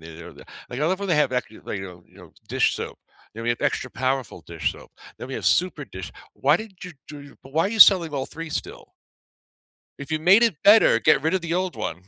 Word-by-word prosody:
de 80 +1 -11
re - - -12
da - - -15 0.3
like, 125 - -5
I 150 - +1
love 185 +2 0
when 200 - -4
they 150 -4 +2
ac 130 -2 -2
uh, 125 - +2
you 110 - -15 0.2
know, 90 -2 -11
you 90 - -23
know, 90 -3 -15 0.2
dish - - +1
soap, - - -7 0.4
then 115 - -7
we 120 - -1
have 120 - -2
extra - - -2
powerful 130 0 -3
dish - - -3
soap, - - -15 0.3
then 120 - -8
we 135 - -6
have - - -6
super 175 -5 +1
dish 95 -6 -9 0.2
why 145 +3 +2
did 215 +1 -9
you 180 - -8 0.2
do 145 -2 -11
but 135 - -15
why 165 +5 +1
are 225 - -5
selling 180 -7 +7
all 135 -1 -3
3 165 +1 -8
still? - - -6 1.1
If 140 +2 -8
you 155 - -1
made 195 +8 +5
it 200 -11 -1
better, 215 +2 +6
get 155 -2 +4
rid 160 +4 0
of 190 - +1
the 170 -1 -5
old 185 0 -2
one. 90 - -5
150 Hz, 250 wpm, -23 LUFS, 125-180 Hz, 1.1 s, selling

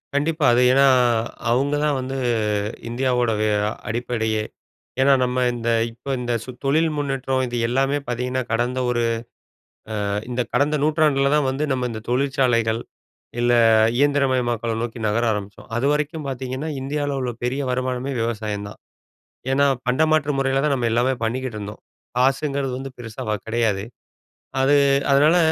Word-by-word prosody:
கண்டிப்பா. 155 +1 +1
அது 125 - +4
ஏன்னா, 135 +1 +5 0.6
அவங்க 135 +4 +1
தான் 150 -2 +1
வந்து 130 +1 -4 0.7
இந்தியாவோட 125 -1 +1
வ - - +2 0.4
அடிப்படையே. 110 -1 -1 0.6
ஏன்னா 140 +1 +5
நம்ம 125 0 0
இந்த 120 -1 -4 0.2
இப்ப 125 +4 -6
இந்த 120 -1 -2 0.3
தொழில் 155 +4 +3
முன்னேற்றம் 135 -2 -1
இது 120 0 -4
எல்லாமே 135 +3 +1
பார்த்தீங்கன்னா, 125 +1 -2
கடந்த 120 +3 0
ஒரு 120 -1 0 1.0
அ - - -1 0.2
இந்த 125 0 0
கடந்த 150 +2 +2
நூற்றாண்டில 150 -3 +2
தான் 145 -3 +2
வந்து 140 +3 -2
நம்ம 125 -1 -1
இந்த 110 - -5
தொழிற்சாலைகள், 125 -4 +1 0.6
இல்லை 120 0 +3 0.4
இயந்திரமயமாக்கல 130 -5 +1
நோக்கி 120 0 -5
நகர 115 +3 +1
ஆரம்பிச்சோம். 105 0 -6
அதுவரைக்கும் 150 +4 0
பார்த்தீங்கன்னா, 130 +3 -4
இந்தியால்ல 140 0 -2
உள்ள 125 -1 -2
பெரிய 130 +3 -1
வருமானமே 130 +1 -2
விவசாயம் 110 -3 -3
தான். - - -13 0.7
ஏன்னா 140 +1 +3 0.2
பண்டமாற்று 155 +3 +2
முறையில 135 0 +1
தான் 145 -2 +2
நம்ம 120 -3 -1
எல்லாமே 125 +3 +2
பண்ணிக்கிட்டு 120 0 -2
இருந்தோம். 105 +1 -7 0.4
காசுங்கிறது 135 +1 +1
வந்து 135 0 -6
பெருசா 115 -3 -7
வ - - +1
கிடையாது. 110 -4 0 0.8
அது 140 +2 +4 0.4
அதனால 150 +5 +5
130 Hz, 135 wpm, -22 LUFS, 120-140 Hz, 1.0 s, ஏன்னா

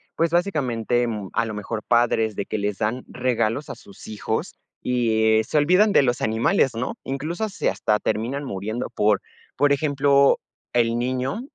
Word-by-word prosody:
pues, 165 0 +1
básicamente, 125 - 0
mm, 105 -4 -4
a 115 - +1
lo 110 - -5
mejor 105 +1 -5
padres 115 -2 +2
de 100 - -3
que - - -3
les 100 -1 -2
dan 115 +4 -1
regalos 125 +2 -1
a - - -5
sus 100 0 -14
hijos, 105 -2 -3 0.3
y, 110 -3 +2
eh, - - +1
se 135 - -2
olvidan 180 +8 +4
de - - +6
los 125 -3 0
animales, 110 +4 +2
¿no?, 115 +2 -3
incluso, 155 +10 -3
se - - -1
hasta 105 0 0
terminan 125 +6 -2
muriendo, 110 -1 -4
por 105 -1 +2 0.4
por 145 +3 +3
ejemplo, 140 -1 +3 0.3
el 115 -1 +2
niño 130 - -2
120 Hz, 170 wpm, -23 LUFS, 110-140 Hz, 0.4 s, de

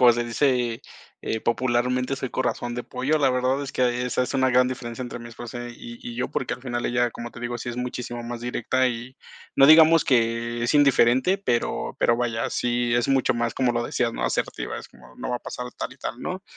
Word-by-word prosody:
como 125 -1 +8
se 120 +1 -1
dice, 120 -1 0 0.4
eh, 110 - -2
popularmente, 125 +3 0
soy 130 - -4
corazón 120 -1 -2
de 125 - -3
pollo. 135 +5 0
La 140 -3 +3
verdad 130 +2 +1
es 135 - -6
que 125 -1 +1
esa 125 - 0
es 125 - -3
una 130 -1 +3
gran 125 0 +4
diferencia 120 -1 -5
entre 120 -1 -6
mi 120 - -9
esposa 120 +1 -8
y 120 0 -10
y 120 - -6
yo, 125 - -2
porque 130 - -2
al 125 - -15
final 120 -2 -3
ella, 120 0 +1
como 120 +1 -7
te - - -11
digo, 120 0 -3
sí 120 - -5
es 120 - -4
muchísimo 125 -1 -4
más 120 0 -6
directa 125 +2 0
y 120 +2 -6 0.4
no 135 - +7
digamos 160 +1 +8
que 120 -1 +1
es 120 - +1
indiferente, 140 +4 +4
pero, 120 -12 -1
pero 120 - +3
vaya, 115 -2 -1
sí 120 -1 0
es 120 +1 +1
mucho 135 -1 +2
más 120 -1 -1
como 125 -2 +1
lo 120 0 0
decías, 120 -1 0
¿no? - - -3
Asertiva, - - -2
es - - -10
como: 60 -1 -18
"No - - -5
va 125 - 0
a - - -7
pasar 125 +1 -6
tal - - -5
y - - -17
tal, 125 - -5
¿no?". 185 +1 -4
120 Hz, 230 wpm, -24 LUFS, 120-130 Hz, 0.4 s, como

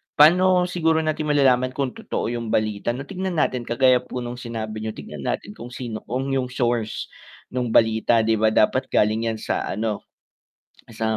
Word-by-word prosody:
paano 180 +4 +6
siguro 165 -3 +1
natin 155 0 -1
malalaman 130 -3 +3
kung 135 -3 -1
totoo 115 - -4
'yung 120 -1 -4
balita 110 +2 0
'no 135 - -5
tignan 185 +2 -4
natin 125 -5 0
kagaya 125 +1 +4
po 125 0 -6
nung 120 +1 -6
sinabi 110 -2 -5
niyo, 110 0 -5
tignan 75 -3 -8
natin 105 - -3
kung 120 +3 -9
sino, 115 -4 -5
kung 130 +4 -2
yung 130 -2 0
source 120 -3 -2 0.4
nung 125 -1 -1
balita 110 0 +4
'di 110 -1 +1
ba 110 - +4
dapat 130 +5 +2
galing 110 +2 +1
'yan 110 - -1
sa - - -2
ano 105 +1 -3 0.9
sa 110 0 -1
120 Hz, 175 wpm, -23 LUFS, 110-135 Hz, 0.9 s, paano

